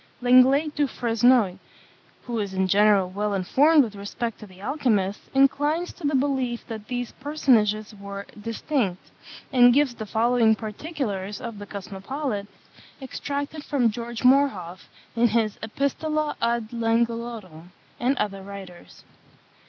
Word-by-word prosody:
Lenglet 260 Hz, +5 st, +5 dB
du 290 Hz, -1 st, +1 dB
Fresnoy, 230 Hz, -4 st, +2 dB, 0.6 s
who 235 Hz, -2 st, -3 dB
is 200 Hz, -2 st, -3 dB
in 190 Hz, 0 st, +1 dB
general 200 Hz, -1 st, +4 dB
well 205 Hz, +1 st, -1 dB
informed 285 Hz, -, +4 dB
with 220 Hz, -4 st, -5 dB
respect 215 Hz, +3 st, -5 dB
to 215 Hz, -, -10 dB
the 185 Hz, -1 st, -17 dB
alchymists, 210 Hz, -5 st, -1 dB
inclines 290 Hz, +5 st, +2 dB
to 355 Hz, -, -16 dB
the 285 Hz, -, +1 dB
belief 260 Hz, -3 st, 0 dB
that 220 Hz, -2 st, -8 dB
these 245 Hz, -1 st, -3 dB
personages 225 Hz, -7 st, +1 dB
were 200 Hz, 0 st, -8 dB, 0.2 s
distinct; 230 Hz, -3 st, -2 dB, 0.4 s
and 245 Hz, -1 st, +6 dB
gives 285 Hz, -3 st, +3 dB
the 220 Hz, -2 st, -7 dB
following 230 Hz, 0 st, +3 dB
particulars 215 Hz, -, -4 dB
of 230 Hz, -4 st, -7 dB
the 205 Hz, -, -8 dB
Cosmopolite, 205 Hz, +3 st, -5 dB, 0.5 s
extracted 285 Hz, +2 st, -5 dB
from 255 Hz, -7 st, +1 dB
George 235 Hz, +1 st, -6 dB
Morhoff, 250 Hz, -10 st, +2 dB, 0.3 s
in 235 Hz, +1 st, +4 dB
his 220 Hz, -1 st, 0 dB
Epistola 295 Hz, +6 st, -1 dB
ad 235 Hz, -1 st, 0 dB
Langelottum, 230 Hz, -7 st, -2 dB, 0.3 s
and 255 Hz, +3 st, +1 dB
other 195 Hz, -2 st, -2 dB
writers. 190 Hz, -3 st, -11 dB
230 Hz, 130 wpm, -25 LUFS, 205-265 Hz, 0.6 s, and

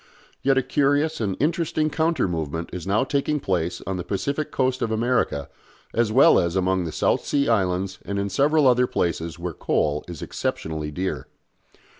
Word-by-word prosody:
Yet 135 Hz, 0 st, +3 dB
a 135 Hz, -, +3 dB
curious 145 Hz, +2 st, +1 dB
and 100 Hz, -3 st, -1 dB
interesting 155 Hz, +1 st, 0 dB
counter 160 Hz, -, +1 dB
movement 80 Hz, -1 st, -3 dB
is 90 Hz, 0 st, -6 dB
now 105 Hz, +5 st, +2 dB
taking 145 Hz, +2 st, 0 dB
place 90 Hz, -7 st, -2 dB
on 95 Hz, -1 st, -2 dB
the 90 Hz, -, -4 dB
Pacific 140 Hz, -, -2 dB
Coast 130 Hz, -1 st, 0 dB
of 115 Hz, -, 0 dB
America, 110 Hz, -, 0 dB, 0.5 s
as 115 Hz, -2 st, +1 dB
well 130 Hz, +5 st, +6 dB
as 85 Hz, 0 st, -1 dB
among 95 Hz, -1 st, +1 dB
the 80 Hz, -, -4 dB
South -, -, +1 dB
Sea 140 Hz, -1 st, +1 dB
Islands 95 Hz, -3 st, 0 dB
and 100 Hz, -, -4 dB
in 100 Hz, 0 st, -1 dB
several 145 Hz, +7 st, +3 dB
other 125 Hz, 0 st, +4 dB
places 85 Hz, -4 st, -2 dB
where 85 Hz, 0 st, -4 dB
coal 75 Hz, 0 st, 0 dB
is 85 Hz, -4 st, -7 dB
exceptionally 80 Hz, -1 st, -3 dB
dear. 90 Hz, +5 st, -3 dB
100 Hz, 175 wpm, -24 LUFS, 90-140 Hz, 0.5 s, well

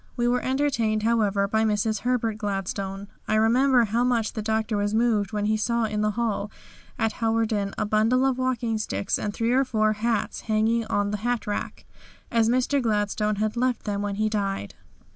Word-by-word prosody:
We 240 Hz, 0 st, +1 dB
were 245 Hz, +1 st, +1 dB
entertained, 260 Hz, -6 st, 0 dB
however, 210 Hz, -3 st, +2 dB
by 220 Hz, +2 st, +1 dB
Mrs. 215 Hz, 0 st, 0 dB
Herbert 230 Hz, -3 st, -1 dB
Gladstone. 195 Hz, -1 st, -3 dB, 0.2 s
I 215 Hz, -, +1 dB
remember 245 Hz, +3 st, +4 dB
how 230 Hz, +3 st, 0 dB
much 235 Hz, -3 st, +1 dB
the 220 Hz, -, -3 dB
Doctor 220 Hz, 0 st, -1 dB
was 205 Hz, +1 st, 0 dB
moved 220 Hz, -3 st, +1 dB
when 210 Hz, -1 st, -1 dB
he 215 Hz, +1 st, +2 dB
saw 235 Hz, +2 st, 0 dB
in 210 Hz, -1 st, -2 dB
the 210 Hz, -, +2 dB
hall 220 Hz, -3 st, -1 dB, 0.5 s
at 225 Hz, -1 st, 0 dB
Hawarden 225 Hz, -3 st, 0 dB
a 215 Hz, -, 0 dB
bundle 220 Hz, +5 st, +2 dB
of 260 Hz, -1 st, +1 dB
walking 240 Hz, -3 st, -1 dB
sticks 200 Hz, -2 st, -1 dB
and 210 Hz, -, -2 dB
three 230 Hz, +3 st, -1 dB
or 265 Hz, +2 st, +4 dB
four 215 Hz, -4 st, +1 dB
hats 225 Hz, +1 st, -1 dB
hanging 225 Hz, +1 st, +1 dB
on 205 Hz, 0 st, 0 dB
the 210 Hz, -, -1 dB
hat 240 Hz, +2 st, -2 dB
rack, 205 Hz, -, -4 dB, 0.5 s
as 230 Hz, -1 st, +3 dB
Mr. 255 Hz, +3 st, +2 dB
Gladstone 210 Hz, -1 st, 0 dB
had 215 Hz, +2 st, -1 dB
left 250 Hz, 0 st, 0 dB
them 205 Hz, -1 st, -2 dB
when 205 Hz, -1 st, -2 dB
he 215 Hz, +1 st, 0 dB
died. 195 Hz, -, -2 dB
220 Hz, 190 wpm, -25 LUFS, 210-235 Hz, 0.5 s, remember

